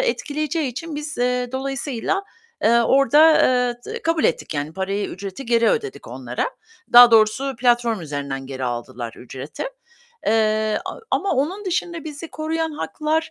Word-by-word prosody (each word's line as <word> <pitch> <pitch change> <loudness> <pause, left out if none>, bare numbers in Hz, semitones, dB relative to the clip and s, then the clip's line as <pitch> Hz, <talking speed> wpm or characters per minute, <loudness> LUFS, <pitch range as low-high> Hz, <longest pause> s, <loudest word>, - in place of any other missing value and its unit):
etkileyeceği 305 - -1
için 295 +5 -6
biz, 300 -2 -6
eee, 250 0 0
dolayısıyla, 270 - -2 0.4
eee, 235 +1 +5
orda, 290 +6 +5
eee, 250 -1 +2 0.2
d 465 - -6
kabul 330 -1 +1
ettik - - 0
yani 145 +1 -3
parayı, 195 +3 -2
ücreti 200 +7 -7
geri 230 -1 +3
ödedik 425 -3 -3
onlara. - - -3 0.4
Daha 240 0 +10
doğrusu 225 +4 +3
platform 240 -3 +2
üzerinden 140 -3 -5
geri 130 -1 -5
aldılar 120 -1 -5
ücreti, 130 +4 -7 0.6
eee, 215 0 +2
a - - -6
ama 395 - 0
onun 345 +10 -1
dışında 345 -3 -2
bizi 310 +1 -7
koruyan 320 +1 -2
haklar, 310 +1 -2
250 Hz, 145 wpm, -22 LUFS, 215-310 Hz, 0.6 s, Daha